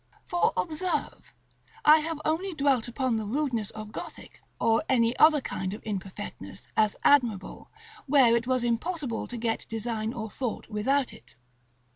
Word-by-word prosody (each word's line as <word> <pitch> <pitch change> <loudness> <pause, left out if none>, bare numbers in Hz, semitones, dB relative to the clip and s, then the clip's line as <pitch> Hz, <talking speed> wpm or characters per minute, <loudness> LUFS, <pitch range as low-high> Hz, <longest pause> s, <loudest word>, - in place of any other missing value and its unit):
For 350 +6 +1
observe, 345 +2 -2 0.5
I 305 +1 +8
have 320 0 -4
only 345 +4 -1
dwelt 275 -5 +2
upon 245 -1 -1
the 220 - -3
rudeness 245 -4 -1
of 215 -1 -8
Gothic, - - -9 0.2
or 225 0 +3
any 235 -2 +3
other 305 -2 +6
kind 190 -5 -4
of - - -12
imperfectness, 200 -1 -6
as 215 -1 +3
admirable, 235 -9 +2 0.4
where 260 -4 +5
it 235 +1 -1
was 255 -1 +1
impossible 240 +1 -2
to 245 - -6
get 225 -1 -2
design 225 0 -2
or 220 -3 -5
thought 235 +2 -4
without 255 +6 0
it. 120 - -17
240 Hz, 150 wpm, -28 LUFS, 220-290 Hz, 0.5 s, I